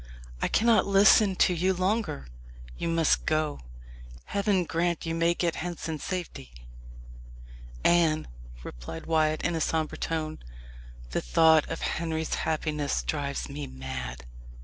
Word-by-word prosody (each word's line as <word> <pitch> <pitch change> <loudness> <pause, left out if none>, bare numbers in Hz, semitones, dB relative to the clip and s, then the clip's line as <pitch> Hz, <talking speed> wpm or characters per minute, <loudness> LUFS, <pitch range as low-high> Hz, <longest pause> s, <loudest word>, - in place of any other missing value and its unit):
I - - +2
cannot 230 -1 +3
listen 200 0 +5
to 180 - +3
you 185 +2 +1
longer. 185 - -1 0.5
You - - -3
must 165 -2 +2
go. 155 -1 0 0.7
Heaven 200 -2 +1
grant 170 0 -1
you 165 - -2
may 165 +1 +2
get 170 -2 -1
hence 175 -1 -5
in 160 -2 -3
safety!" 175 - -5 1.3
"Anne," 165 -3 +3 0.4
replied - - -8
Wyat 155 -1 +1
in 175 - 0
a 165 - -2
sombre 160 0 -1
tone, 155 -1 -3 0.7
"the - - -1
thought 160 - +4
of - - -4
Henry's 160 -1 -2
happiness 150 -2 -1
drives 140 -2 -3
me 140 0 -6
mad. 65 -2 -6
160 Hz, 130 wpm, -27 LUFS, 150-175 Hz, 1.3 s, listen